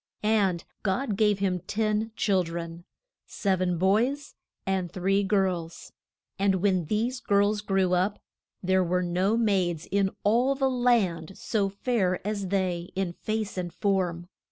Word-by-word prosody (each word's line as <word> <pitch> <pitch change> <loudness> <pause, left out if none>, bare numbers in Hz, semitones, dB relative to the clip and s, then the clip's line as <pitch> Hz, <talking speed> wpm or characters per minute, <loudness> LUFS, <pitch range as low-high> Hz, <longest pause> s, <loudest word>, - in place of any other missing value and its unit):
And 200 -5 +2 0.2
God 215 +3 -1
gave 210 -1 +3
him 190 -2 0
ten 215 +1 0
chil 195 -5 +2
dren: 170 0 -6 0.4
sev 190 -2 -1
en 180 -1 +1
boys 235 - +1 0.3
and 190 -3 -1
three 195 +2 +1
girls. 185 -4 -1 0.5
And 195 -1 +3
when 185 -2 +1
these 230 - -1
girls 205 0 +2
grew 195 -3 +1
up, 185 +3 +1 0.5
there 190 0 +3
were 180 +1 0
no 185 +5 +1
maids 185 -7 +1
in 200 -1 +2
all 245 +6 +3
the 265 -1 +1
land 205 -9 +1
so 205 -3 0
fair 200 -3 0
as 205 -2 -2
they 180 -2 -1
in 190 -2 -1
face 215 0 -3
and 175 -1 -4
form. 180 -2 -1
195 Hz, 145 wpm, -27 LUFS, 180-215 Hz, 0.5 s, gave